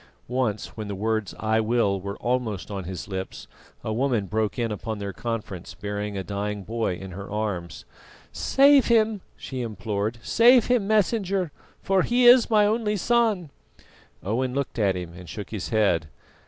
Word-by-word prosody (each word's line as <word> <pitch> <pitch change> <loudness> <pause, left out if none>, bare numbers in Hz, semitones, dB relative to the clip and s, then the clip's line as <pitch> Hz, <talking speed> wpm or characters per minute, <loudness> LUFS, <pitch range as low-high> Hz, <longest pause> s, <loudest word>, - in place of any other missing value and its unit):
Once, 125 -4 -2
when 110 -2 -5
the 100 - -4
words 110 0 -1
"I 110 0 +1
will" 110 -4 +1
were 100 +1 -5
almost 120 -6 -2
on 95 -3 -4
his 90 -1 -6
lips, 95 -2 -6 0.4
a 110 - -2
woman 120 -3 +1
broke 110 +3 -1
in 115 -2 -1
upon 110 +1 -4
their 100 -1 -5
conference 110 -6 -5
bearing 105 0 -4
a 95 - -3
dying 100 +1 -3
boy 110 -2 -2
in 95 +1 -8
her 100 +3 -8
arms. 100 -5 -4 0.5
"Save 275 0 +5
him," 220 -3 +3 0.2
she 130 -2 -5
implored, 105 0 -3
"save 240 0 +6
him, 245 -5 +1
Messenger, 200 -4 +1 0.3
for 195 -1 +3
he 245 +5 +2
is 245 0 +8
my 210 -2 +5
only 210 0 +1
son!" 215 -7 +1 0.7
Owen 125 +6 -1
looked 140 -3 -2
at 100 -3 +2
him 90 -2 -6
and 90 0 -11
shook 105 -4 -7
his 105 -6 -4
head. 100 -8 +2
110 Hz, 170 wpm, -25 LUFS, -, 0.7 s, is